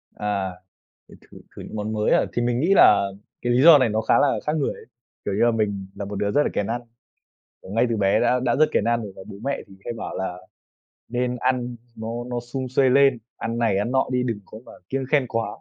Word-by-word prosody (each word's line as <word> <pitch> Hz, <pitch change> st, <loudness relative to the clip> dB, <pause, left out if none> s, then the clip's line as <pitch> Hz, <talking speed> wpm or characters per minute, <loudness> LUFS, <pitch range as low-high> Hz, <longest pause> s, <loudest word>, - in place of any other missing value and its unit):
À, 100 Hz, -2 st, -2 dB, 0.6 s
thử -, -, -14 dB, 0.2 s
thử -, -, -13 dB, 0.2 s
thử -, -, -8 dB
những -, -, -9 dB
món 105 Hz, +1 st, -3 dB
mới 105 Hz, -1 st, 0 dB
à? -, -, +4 dB
Thì 120 Hz, -, 0 dB
mình 120 Hz, 0 st, 0 dB
nghĩ 180 Hz, +7 st, +3 dB
là 100 Hz, -, +6 dB, 0.3 s
cái 120 Hz, 0 st, 0 dB
lý 125 Hz, -, +3 dB
do 165 Hz, -3 st, +10 dB
này 130 Hz, -4 st, +2 dB
nó 110 Hz, +1 st, 0 dB
khá -, -, +3 dB
là 145 Hz, -, +2 dB
khác 150 Hz, -, +1 dB
người 145 Hz, -, 0 dB
ấy, -, -, -14 dB, 0.4 s
kiểu 100 Hz, -, -1 dB
như 100 Hz, -, +2 dB
là, 120 Hz, -, +4 dB
mình 100 Hz, -4 st, -2 dB
là 100 Hz, -, -5 dB
một 100 Hz, -, -6 dB
đứa 100 Hz, +1 st, -1 dB
rất 145 Hz, -, +3 dB
là -, -, 0 dB
kén 100 Hz, -, -1 dB
ăn. 120 Hz, +2 st, -2 dB, 0.8 s
Kiểu, 95 Hz, -, -11 dB
ngay 115 Hz, +3 st, +2 dB
từ 115 Hz, -, 0 dB
bé 100 Hz, -1 st, +2 dB
đã 125 Hz, -, +2 dB
đã 120 Hz, -2 st, +2 dB
rất 155 Hz, +1 st, +5 dB
kén 105 Hz, -, +2 dB
ăn 120 Hz, 0 st, +1 dB
rồi 100 Hz, -, -7 dB
và -, -, -9 dB
bố -, -, -9 dB
mẹ 140 Hz, +1 st, -1 dB
thì 95 Hz, -, -16 dB
hay 120 Hz, -, -3 dB
bảo 115 Hz, -, -6 dB
là 95 Hz, -1 st, -4 dB, 0.7 s
nên 125 Hz, +1 st, -1 dB
ăn 125 Hz, -1 st, -1 dB, 0.2 s
nó 110 Hz, 0 st, -6 dB, 0.2 s
nó 120 Hz, -1 st, -3 dB
sum 130 Hz, +2 st, -5 dB
suê 130 Hz, +1 st, +2 dB
lên, 135 Hz, -1 st, +4 dB, 0.2 s
ăn 115 Hz, +1 st, -4 dB
này, 110 Hz, -5 st, +2 dB
ăn 105 Hz, +4 st, -1 dB
nọ 130 Hz, -, +2 dB
đi, 125 Hz, 0 st, +1 dB
đừng 115 Hz, -4 st, -2 dB
có 110 Hz, -, -11 dB
mà -, -, -12 dB, 0.2 s
kiêng 135 Hz, 0 st, -2 dB
khem 145 Hz, -4 st, +3 dB
quá. 115 Hz, 0 st, -1 dB
120 Hz, 260 wpm, -23 LUFS, 105-125 Hz, 0.8 s, do